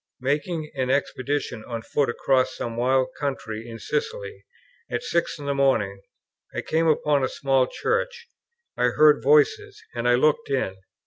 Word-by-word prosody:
Making 150 +4 -1
an 130 -3 -2
expedition 135 -3 -1
on 115 -2 -5
foot 140 +1 0
across 130 +1 +1
some 115 -1 -4
wild 130 +2 +2
country 115 -6 -4
in 115 - -7
Sicily, 455 - -4 0.4
at - - -2
six 170 -8 -1
in 145 - -8
the 140 - 0
morning, 115 -8 +1 0.5
I - - -1
came 165 +1 +1
upon 150 -2 +2
a 130 - +1
small 135 -3 +1
church; 475 - -2 0.5
I 125 - +1
heard 150 +4 +5
voices, 435 -2 +3
and 120 0 0
I 120 - +6
looked 145 +3 +2
in. 130 -8 -1
140 Hz, 155 wpm, -24 LUFS, 125-165 Hz, 0.5 s, I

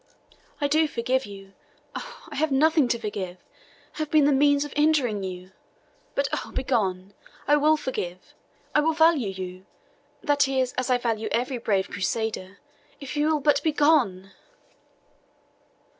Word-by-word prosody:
"I 290 - +1
do 310 +2 +3
forgive 255 -1 -1
you 195 -1 -12 0.4
oh, - - -8
I 295 - -8
have 310 +1 +1
nothing 305 +1 +4
to 235 - 0
forgive! 195 -5 -5 0.5
have 310 -2 -4
been 305 -2 +4
the 290 - +4
means 285 +1 +3
of 290 - -9
injuring 290 -9 +2
you. 185 0 -7 0.6
But 280 0 +1
oh, - - -3
begone! 200 -7 -1 0.3
I 295 - +5
will 305 +2 +4
forgive 185 -11 -5 0.4
I 300 - +4
will 320 +2 +1
value 320 -8 +3
you 185 -1 -7 0.6
that 285 -1 +3
is, 260 -2 0
as 255 0 -2
I 250 - +4
value 225 -3 -2
every 250 +1 -1
brave 200 -5 0
Crusader 200 -1 -3 0.4
if 275 0 -7
you 295 +1 +1
will 310 -2 +1
but 285 0 +3
begone!" 290 - +2
260 Hz, 150 wpm, -25 LUFS, 200-295 Hz, 0.6 s, I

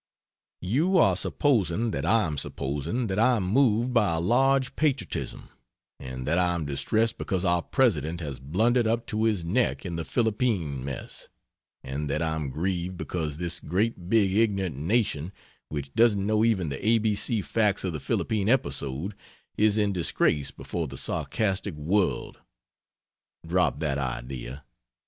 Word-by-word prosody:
You 155 - +2
are - - +5
supposing 115 - +1
that 70 -1 -2
I 115 -3 +4
am 80 -2 -3
supposing 75 - -2
that 100 -1 -1
I 125 +2 +4
am 105 - -1
moved 120 +3 +2
by 105 -8 +3
a - - 0
Large 130 +7 +2
Patriotism, 135 - -2 0.5
and 65 -1 -7
that 85 +4 +2
I 90 -1 +2
am 80 -3 -3
distressed 110 +11 0
because 95 -1 -1
our 85 0 +3
President 85 - +1
has 70 -6 -5
blundered 110 - +1
up 115 +1 0
to 110 +1 -1
his 105 -7 0
neck 110 +5 0
in 85 -2 -4
the 80 - -2
Philippine 105 - 0
mess; 70 -1 -7 0.5
and 70 +3 -4
that 75 - 0
I 80 -1 0
am 75 -3 -3
grieved 90 +4 -2
because 80 -5 -3
this 85 0 -2
great 95 0 -2
big 100 -4 +3
ignorant 100 -7 +1
nation, 85 - 0 0.4
which 70 -2 -5
doesn't 110 -4 +3
know 110 +1 +2
even 100 -8 +1
the 70 - -6
A 115 +2 +4
B 110 -1 +1
C 105 +1 0
facts 105 -2 +1
of 90 -3 -2
the 75 - -3
Philippine 105 +7 -1
episode, 70 - 0 0.4
is 105 0 +3
in 105 -2 +1
disgrace 80 -5 +1
before 85 -3 -5
the 70 0 -8
sarcastic 95 - -1
world 90 +6 -1 1.1
drop 70 - +1
that 70 -3 0
idea! 65 +1 -5
95 Hz, 160 wpm, -27 LUFS, 75-110 Hz, 1.1 s, are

